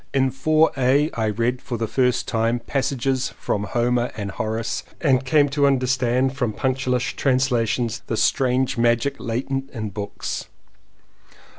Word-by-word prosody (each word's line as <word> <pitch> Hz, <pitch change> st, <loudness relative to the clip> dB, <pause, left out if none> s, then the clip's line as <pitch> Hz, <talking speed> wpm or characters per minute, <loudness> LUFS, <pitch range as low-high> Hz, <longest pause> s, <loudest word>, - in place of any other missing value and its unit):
In 135 Hz, -1 st, +3 dB
Four 155 Hz, +4 st, +3 dB
A, 135 Hz, +4 st, +3 dB
I 110 Hz, -, -1 dB
read 120 Hz, +4 st, -1 dB
for 120 Hz, -3 st, -4 dB
the 115 Hz, -, -1 dB
first 125 Hz, +2 st, +1 dB
time 115 Hz, +2 st, +1 dB
pass 135 Hz, +4 st, -1 dB
ages 130 Hz, 0 st, -1 dB
from 105 Hz, 0 st, -2 dB
Homer 120 Hz, +1 st, 0 dB
and 100 Hz, -2 st, -4 dB
Horace 110 Hz, +2 st, -2 dB, 0.2 s
and 135 Hz, -4 st, +2 dB
came 145 Hz, +2 st, +4 dB
to 140 Hz, 0 st, +2 dB
understand 130 Hz, -1 st, +1 dB
from 125 Hz, -6 st, -1 dB
punctilious 130 Hz, 0 st, 0 dB
translations 120 Hz, -3 st, 0 dB
the 115 Hz, -, -2 dB
strange 130 Hz, 0 st, +1 dB
magic 120 Hz, +4 st, +2 dB
latent 135 Hz, +3 st, -3 dB
in 110 Hz, -5 st, -5 dB
books. 100 Hz, 0 st, -5 dB
125 Hz, 145 wpm, -22 LUFS, 115-135 Hz, 0.2 s, came